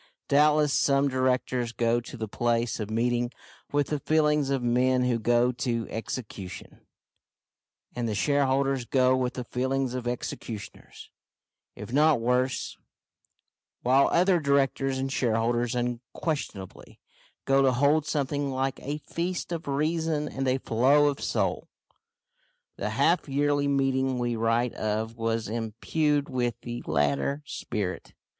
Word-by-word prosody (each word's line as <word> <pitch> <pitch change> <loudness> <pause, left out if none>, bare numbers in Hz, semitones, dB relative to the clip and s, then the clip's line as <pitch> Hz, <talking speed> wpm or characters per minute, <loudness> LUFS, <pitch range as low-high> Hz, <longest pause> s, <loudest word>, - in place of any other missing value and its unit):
Doubtless 150 0 +4
some 140 0 +3
directors 130 -2 0
go 120 0 +1
to 120 +2 -10
the 110 -1 -4
place 120 +2 0
of 105 -1 -4
meeting 120 +2 0 0.4
with 145 -1 +1
the 150 - -1
feelings 150 -2 +2
of 135 -2 0
men 125 +1 +2
who 125 -2 +1
go 120 +2 +3
to 120 -2 -2
execution, 110 -5 -7 1.1
and 120 -2 -2
the 105 - -2
shareholders 135 0 +1
go 130 +1 +3
with 130 0 -1
the 125 - -4
feelings 130 +1 -1
of 125 -1 -4
executioners, 115 -3 -6 0.6
if 120 - -8
not 150 -1 +4
worse; 125 +2 0 1.1
while 130 +3 +4
other 180 0 +3
directors 135 -2 +1
and 135 0 -2
shareholders 120 0 0
unquestionably 120 - -4 0.5
go 135 0 +4
to 135 -1 +4
hold 145 +4 +2
something 145 -1 -1
like 135 0 -2
a 145 +2 -3
feast 175 +4 -4
of 165 -3 -4
reason 155 +1 0
and 135 -2 -3
a 130 +1 +2
flow 135 +5 +3
of 140 - -4
soul. - - -1 1.1
The - - -3
half 170 -3 +2
yearly 145 +1 +1
meeting 135 -2 +1
we 120 -1 -1
write 115 +2 +1
of 110 +1 -2
was 115 -1 -1
imbued 130 +7 -1
with 125 -4 -1
the 120 0 -6
latter 75 - 0
spirit. 105 -6 -5
130 Hz, 135 wpm, -27 LUFS, 120-140 Hz, 1.1 s, Doubtless